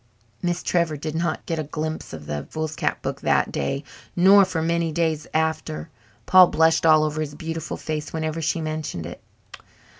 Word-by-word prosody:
Miss 175 Hz, 0 st, -1 dB
Trevor 170 Hz, -3 st, +1 dB
did 155 Hz, +1 st, -5 dB
not 165 Hz, 0 st, -2 dB
get 165 Hz, -2 st, -2 dB
a -, -, -1 dB
glimpse 155 Hz, +2 st, -4 dB
of 80 Hz, -2 st, -8 dB
the 75 Hz, -1 st, -4 dB
foolscap 155 Hz, -3 st, -2 dB
book -, -, -4 dB
that -, -, +2 dB
day, 105 Hz, -, -2 dB, 0.3 s
nor 195 Hz, +3 st, +7 dB
for 165 Hz, -4 st, -2 dB
many 170 Hz, 0 st, 0 dB
days 160 Hz, -2 st, -1 dB
after. 160 Hz, 0 st, -1 dB, 0.4 s
Paul 185 Hz, -1 st, +8 dB
blushed 160 Hz, 0 st, +3 dB
all 155 Hz, -1 st, +6 dB
over 155 Hz, 0 st, -1 dB
his 145 Hz, -1 st, -4 dB
beautiful 160 Hz, 0 st, -5 dB
face 155 Hz, -1 st, -4 dB
whenever 160 Hz, 0 st, -3 dB
she 160 Hz, +1 st, 0 dB
mentioned 155 Hz, -, -4 dB
it. 85 Hz, -, -8 dB
160 Hz, 175 wpm, -23 LUFS, 155-165 Hz, 0.4 s, Paul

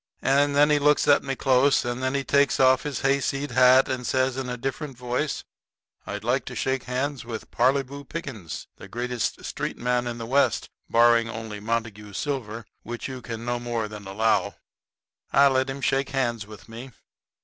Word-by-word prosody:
And 140 Hz, +1 st, +3 dB
then 145 Hz, +1 st, +5 dB
he 150 Hz, -, +4 dB
looks 150 Hz, 0 st, +3 dB
at 145 Hz, -, +6 dB
me 135 Hz, 0 st, -3 dB
close, 130 Hz, 0 st, +3 dB
and 120 Hz, +1 st, -3 dB
then 130 Hz, +1 st, 0 dB
he 135 Hz, -, 0 dB
takes 140 Hz, +1 st, +2 dB
off 130 Hz, -1 st, +5 dB
his 145 Hz, -3 st, -4 dB
hayseed 140 Hz, 0 st, 0 dB
hat, 130 Hz, +1 st, +6 dB
and 125 Hz, -2 st, -3 dB
says, 130 Hz, -1 st, +1 dB
in 130 Hz, -1 st, -4 dB
a 125 Hz, -, -3 dB
different 135 Hz, +2 st, -4 dB
voice: 125 Hz, +4 st, -2 dB, 0.6 s
"I'd 105 Hz, +1 st, -5 dB
like 125 Hz, +2 st, +1 dB
to -, -, -7 dB
shake 130 Hz, -1 st, -1 dB
hands 130 Hz, +1 st, -2 dB
with 115 Hz, -2 st, -7 dB
Parleyvoo 135 Hz, +3 st, +1 dB
Pickens, 130 Hz, -, -6 dB
the -, -, -11 dB
greatest 120 Hz, -1 st, -3 dB
street -, -, -4 dB
man 125 Hz, 0 st, 0 dB
in 120 Hz, -1 st, -4 dB
the 115 Hz, -, -5 dB
West, 135 Hz, +4 st, +1 dB, 0.2 s
barring 115 Hz, 0 st, +4 dB
only 110 Hz, -2 st, -6 dB
Montague 110 Hz, -1 st, -3 dB
Silver, 115 Hz, -3 st, -4 dB, 0.2 s
which 120 Hz, 0 st, -6 dB
you 130 Hz, -2 st, -7 dB
can 115 Hz, 0 st, -6 dB
no 120 Hz, 0 st, -1 dB
more 120 Hz, -2 st, -2 dB
than 105 Hz, -2 st, -9 dB
allow." 110 Hz, +3 st, +1 dB, 0.8 s
I 140 Hz, +2 st, +6 dB
let 130 Hz, 0 st, +1 dB
him 135 Hz, +1 st, -5 dB
shake 135 Hz, +1 st, +1 dB
hands 120 Hz, -6 st, -1 dB
with 105 Hz, -3 st, -13 dB
me. 115 Hz, +4 st, -9 dB
125 Hz, 185 wpm, -25 LUFS, 115-135 Hz, 0.8 s, at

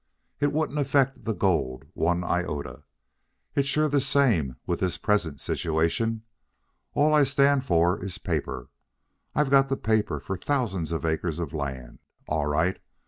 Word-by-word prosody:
It 145 Hz, 0 st, +2 dB
wouldn't 150 Hz, 0 st, -1 dB
affect 135 Hz, -1 st, +1 dB
the 110 Hz, -, 0 dB
gold 80 Hz, -9 st, 0 dB
one 90 Hz, +2 st, +1 dB
iota. 85 Hz, -5 st, -3 dB, 0.7 s
It's 140 Hz, -1 st, +1 dB
sure 155 Hz, +2 st, +2 dB
the 145 Hz, -1 st, +2 dB
same 120 Hz, -, +2 dB
with 85 Hz, -, -1 dB
this 95 Hz, -2 st, 0 dB
present 85 Hz, -9 st, 0 dB
situation. 90 Hz, -, 0 dB, 0.7 s
All 150 Hz, +1 st, +4 dB
I 150 Hz, -1 st, +6 dB
stand 140 Hz, 0 st, +3 dB
for 85 Hz, 0 st, +2 dB
is 95 Hz, -2 st, -4 dB
paper. 60 Hz, -1 st, -3 dB, 0.7 s
I've 150 Hz, -2 st, +2 dB
got 135 Hz, -1 st, +5 dB
the 135 Hz, -, 0 dB
paper 110 Hz, -1 st, 0 dB
for 95 Hz, -, -4 dB
thousands 95 Hz, -, -1 dB
of 80 Hz, 0 st, -2 dB
acres 80 Hz, 0 st, -1 dB
of 85 Hz, -5 st, -4 dB
land. 65 Hz, -5 st, -5 dB, 0.3 s
All 75 Hz, -1 st, 0 dB
right. 80 Hz, +5 st, +1 dB
95 Hz, 150 wpm, -26 LUFS, -, 0.7 s, I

